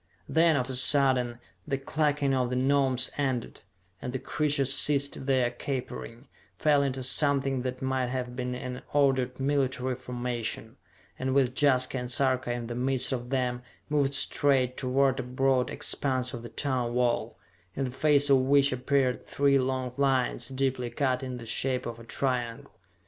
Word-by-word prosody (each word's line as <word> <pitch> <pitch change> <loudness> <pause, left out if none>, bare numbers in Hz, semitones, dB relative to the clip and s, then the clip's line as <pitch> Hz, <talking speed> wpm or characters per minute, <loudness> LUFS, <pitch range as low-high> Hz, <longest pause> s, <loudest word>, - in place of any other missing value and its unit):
Then, 165 0 +3
of 125 -3 0
a 135 - -3
sudden, 130 -2 +3 0.3
the 140 -2 0
clucking 145 0 0
of 125 -2 +1
the 125 - -2
Gnomes 130 -1 +2
ended, 130 -4 -2 0.4
and 125 - -4
the - - -1
creatures 140 -1 0
ceased 140 -2 +2
their 130 -3 +2
capering, 125 -1 -6 0.3
fell 150 -2 +3
into 135 -2 -2
something 135 0 +1
that 130 +1 -4
might 130 -1 0
have 125 -1 -4
been 125 0 -3
an 125 0 -6
ordered 130 -3 +2
military 135 -2 0
formation, 120 -1 -4 0.4
and 130 0 -1
with 130 -3 +3
Jaska 130 -2 +3
and 125 0 -5
Sarka 130 -2 +1
in 120 -1 -3
the 120 - -5
midst 130 +2 0
of 120 -2 -3
them, 125 -2 -1 0.3
moved 140 -2 +1
straight 135 -2 +2
toward 130 +1 +1
a - - +1
broad 130 0 +1
expanse 130 -2 -2
of 120 - -6
the 120 - -9
tunnel 130 -4 -1
wall, 120 -1 0 0.4
in 135 - -1
the 130 - -3
face 145 +2 +3
of 135 - +7
which 140 +1 +3
appeared 130 0 0
three 140 -1 +2
long 130 -1 -2
lines, 130 -3 +1
deeply 130 -2 -1
cut 130 +1 0
in 130 -1 -5
the 115 - -9
shape 125 +3 -1
of 115 -1 -6
a - - -11
triangle. 120 -1 -3
130 Hz, 165 wpm, -28 LUFS, 125-140 Hz, 0.4 s, of